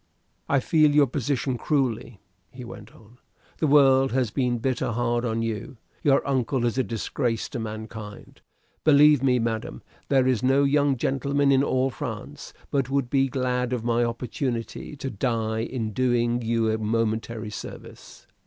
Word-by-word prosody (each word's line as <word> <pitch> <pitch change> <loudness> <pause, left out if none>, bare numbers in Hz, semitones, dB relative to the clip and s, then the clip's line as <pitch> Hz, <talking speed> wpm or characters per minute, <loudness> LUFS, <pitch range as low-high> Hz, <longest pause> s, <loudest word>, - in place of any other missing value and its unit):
"I 140 - +3
feel 150 +2 +3
your 150 -1 +6
position 130 -1 -2
cruelly," 125 -7 -1 0.3
he 125 +3 -10
went 110 -1 -11
on. 115 -1 -19 0.4
"The 155 - +2
world 135 -3 +5
has 125 -4 0
been 125 -1 0
bitter 120 -1 -1
hard 120 0 0
on 115 -1 -1
you. 115 +2 -4 0.2
Your 140 -1 +2
uncle 130 -2 0
is 120 +2 0
a - - +3
disgrace 115 +1 -2
to 125 - -5
mankind. 110 -1 -8 0.4
Believe 150 -2 +6
me, 130 -2 +3
madam, 115 -2 -3 0.3
there 135 -2 +3
is 130 -3 +1
no 135 +2 +3
young 140 -1 +2
gentleman 140 +1 +1
in 135 -1 +4
all 130 -1 +1
France 110 - -7 0.2
but 135 -3 0
would 135 -3 -1
be 135 -1 +3
glad 125 -1 -1
of 120 -3 -2
my 120 0 +1
opportunity, 120 +3 -4
to 135 -1 -5
die 110 0 -1
in 115 -2 -3
doing 120 0 +1
you 115 -1 +1
a 110 - -1
momentary 110 0 -2
service." - - -10
125 Hz, 160 wpm, -25 LUFS, 115-135 Hz, 0.4 s, your